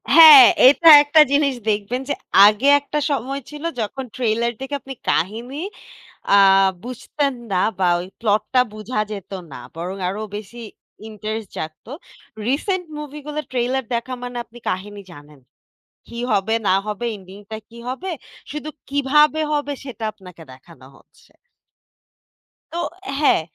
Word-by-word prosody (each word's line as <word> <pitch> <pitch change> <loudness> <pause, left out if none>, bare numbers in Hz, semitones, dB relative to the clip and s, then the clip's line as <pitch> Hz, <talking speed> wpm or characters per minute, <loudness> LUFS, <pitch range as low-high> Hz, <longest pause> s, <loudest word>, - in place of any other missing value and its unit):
হ্যা, 330 - +10 0.4
এইটা 325 +4 +6
একটা 300 +2 +5
জিনিস 280 -2 +2
দেখবেন 215 +5 -1
যে - - +1 0.3
আগে 215 +6 +1
একটা 295 +1 -4
সময় 275 0 -3
ছিল 295 0 -10 0.2
যখন 260 +5 -4
ট্রেইলার 235 -1 0
দেখে 270 +2 -4
আপনি 270 - -8 0.2
কাহিনী 230 - -2 0.8
আ - - +7 0.5
বুঝতেন 275 +3 -3 0.2
না 185 -1 +2 0.2
বা 185 - +2
ওই 180 - -7
প্লটটা 220 +4 +1
বুঝা 215 +1 -4
যেত 200 -3 -8 0.2
না। - - -8 0.2
বরং 180 +3 -5
আরো 200 +3 -4 0.2
বেশি 215 +3 -9 0.5
ইন্টারেস্ট 215 0 -6
জাগত। 155 0 -7 0.6
রিসেন্ট 360 +7 -1
মুভি 300 0 -8
গুলো 300 0 -3
ট্রেইলার 255 +1 -1
দেখা 235 +2 -3
মানে 245 0 -6
আপনি 240 +1 -16
কাহিনী 205 +2 -4
জানেন। 145 -1 -15 0.7
কি 235 - -9
হবে 210 +3 +1
না 185 - +4
হবে 210 +2 -4
ইন্ডিং 190 0 -14
টা 220 - -4
কি 235 - -13
হবে, 305 +10 -5 0.4
শুধু 300 +1 -6 0.2
কিভাবে 300 +2 +3
হবে 290 -1 -1
সেটা 240 -4 -7
আপনাকে 180 -5 -14
দেখানো 130 +1 -17
হচ্ছে। - - -25 1.4
তো 335 - -5 0.4
হ্যাঁ। 295 - +3
240 Hz, 140 wpm, -20 LUFS, 205-280 Hz, 1.4 s, হ্যা